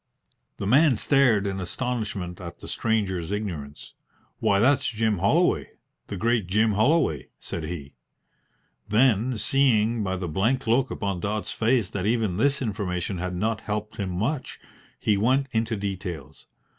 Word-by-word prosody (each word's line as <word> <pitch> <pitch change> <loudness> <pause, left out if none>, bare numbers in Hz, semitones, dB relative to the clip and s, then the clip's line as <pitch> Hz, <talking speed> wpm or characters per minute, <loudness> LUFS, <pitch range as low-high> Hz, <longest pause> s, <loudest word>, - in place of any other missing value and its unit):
The - - -4
man 135 +5 +5
stared 120 -4 +3
in 95 -1 -2
astonishment 100 -3 -3
at 85 -1 -8
the - - -11
stranger's 95 -7 -1
ignorance. 85 -9 -5 0.5
"Why, 100 - +3
that's 130 +5 +3
Jim 110 -3 0
Holloway, 160 - +2 0.3
the 100 - -5
great 115 -1 +1
Jim 110 +4 +3
Holloway," 110 - +2
said 80 - -5
he; 75 -4 -6 1.0
then, 115 +1 +3
seeing 115 -1 +2
by 95 -1 -1
the 90 -1 -4
blank 110 - 0
look 125 +4 +2
upon 100 -3 -3
Dodds's 100 +1 -2
face 115 -2 +2
that 100 0 -2
even 110 -5 +1
this 140 +4 +1
information 95 -4 -2
had 90 0 -3
not 110 +4 -1
helped 105 0 -4
him 100 -3 -2
much, 120 - -2 0.4
he 105 - +2
went 130 +6 +2
into 115 -1 0
details. 95 -8 -6
105 Hz, 145 wpm, -25 LUFS, 95-120 Hz, 1.0 s, man